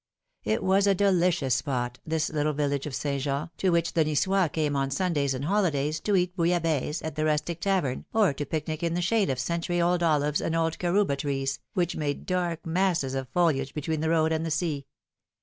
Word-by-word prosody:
It 110 +1 0
was 195 +2 +3
a 200 - +4
delicious 180 -8 +2
spot, 125 -4 -2
this 160 0 0
little 150 0 0
village 145 -1 -1
of 140 - -5
St. 140 -2 -2
Jean, 140 +4 -2
to 190 - +1
which 170 -1 +1
the 165 - +3
Ni9ois 165 +3 +1
came 150 -3 0
on 135 -1 0
Sundays 140 -3 0
and 130 +2 -4
holidays 160 -5 +1
to 205 - 0
eat 180 -1 +1
bouillabaisse 165 -4 0
at 160 - -4
the 155 +1 -2
rustic 155 +2 0
tavern 185 -10 0
or 215 -8 +3
to 145 - -4
picnic 155 +1 -3
in 170 -1 0
the 175 - 0
shade 210 0 +2
of 130 - 0
century 170 +5 -1
old 175 +1 +2
olives 150 -3 +2
and 165 - -1
old 165 -1 0
carouba 180 -3 +2
trees, 135 -1 -2 0.2
which 175 -1 0
made 145 -2 -3
dark 175 -3 -2
masses 170 -5 +1
of 135 -2 -3
foliage 140 -4 +1
between 155 +1 -2
the 160 +1 0
road 160 -1 +2
and 160 0 0
the 165 - -2
sea. 150 -4 -2
160 Hz, 205 wpm, -27 LUFS, 145-175 Hz, 0.2 s, a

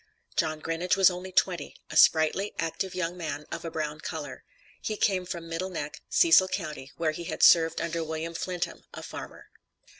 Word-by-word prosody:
John 155 -1 0
Grinage 170 +3 0
was 190 -1 +7
only 180 +1 -7
twenty, 180 -4 +1 0.2
a - - -6
sprightly, 160 +6 +4
active 170 +3 -3
young 180 -1 -2
man, 160 -4 -5
of - - -5
a 165 - -4
brown 155 -1 -3
color. 155 -2 -6 0.4
He 215 - -3
came 185 -3 +1
from 170 -2 -5
Middle 165 +3 -3
Neck, 150 -5 -5
Cecil 330 - +6
county, 155 -7 -5
where 160 -2 +1
he 170 +2 -7
had - - -3
served 165 -1 +6
under 170 0 -2
William 160 +1 -4
Flintham, 175 +1 -4
a - - -8
farmer. - - -9
165 Hz, 180 wpm, -28 LUFS, 160-185 Hz, 0.4 s, was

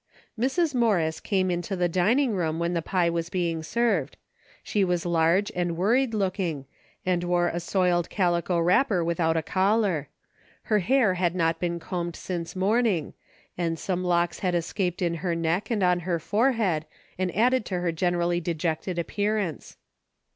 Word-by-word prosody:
Mrs. 275 +7 0
Morris 195 -10 +1
came 185 -2 0
into 175 +3 -2
the 175 -1 +1
dining 220 - +2
room 165 -4 -1
when 170 +1 -1
the 170 - 0
pie 175 0 +1
was 170 0 -2
being 170 -3 -1
served. 235 +9 0 0.5
She 205 - 0
was 180 -2 0
large 170 +3 +2
and 175 -2 -1
worried 230 +6 +2
looking, 185 -8 -1 0.4
and 180 -1 +1
wore 175 0 +1
a 170 - -3
soiled 175 -1 +1
calico 175 -2 +1
wrapper 180 +3 +3
without 165 -1 +1
a 160 - 0
collar. 190 -5 +1 0.5
Her 215 -1 +2
hair 220 +1 +3
had 180 -1 0
not 165 -2 +1
been 170 -1 -2
combed 170 0 -4
since 175 -2 -5
morning 200 -3 +1 0.4
and 165 -2 -1
some 180 +1 -2
locks 175 -1 +1
had 180 -2 0
escaped 180 +1 -1
in 170 -1 +1
her 175 -3 -1
neck 165 +4 -1
and 215 -5 0
on 180 -1 +3
her 175 0 -1
forehead 200 - +1 0.3
and 185 -1 0
added 250 +3 +3
to 180 -2 -2
her 175 -1 0
generally 175 +1 0
dejected 170 +1 -2
appear 205 +5 -1
ance. 180 -7 -4
180 Hz, 165 wpm, -26 LUFS, 170-200 Hz, 0.5 s, wrapper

